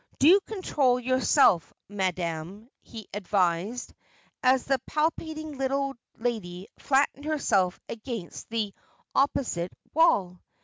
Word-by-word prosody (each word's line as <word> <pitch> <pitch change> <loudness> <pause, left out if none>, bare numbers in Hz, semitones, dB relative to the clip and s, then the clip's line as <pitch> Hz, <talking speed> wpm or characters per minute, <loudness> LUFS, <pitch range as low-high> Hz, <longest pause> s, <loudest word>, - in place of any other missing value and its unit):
"Do 345 +8 +7
control 280 - +1
yourself, 255 - +3 0.2
madam," 185 +1 -3
he 220 -3 -10
advised, 195 +2 0 0.5
as 255 0 +4
the 270 -2 +1
palpitating 310 -1 -2
little 275 +1 0 0.2
lady 200 -6 -4
flattened 285 +1 +1
herself 205 -12 +1
against 225 -5 -7
the 220 -3 -2 0.4
opposite 225 -10 0 0.2
wall. 195 - +3
240 Hz, 95 wpm, -27 LUFS, 190-275 Hz, 0.5 s, Do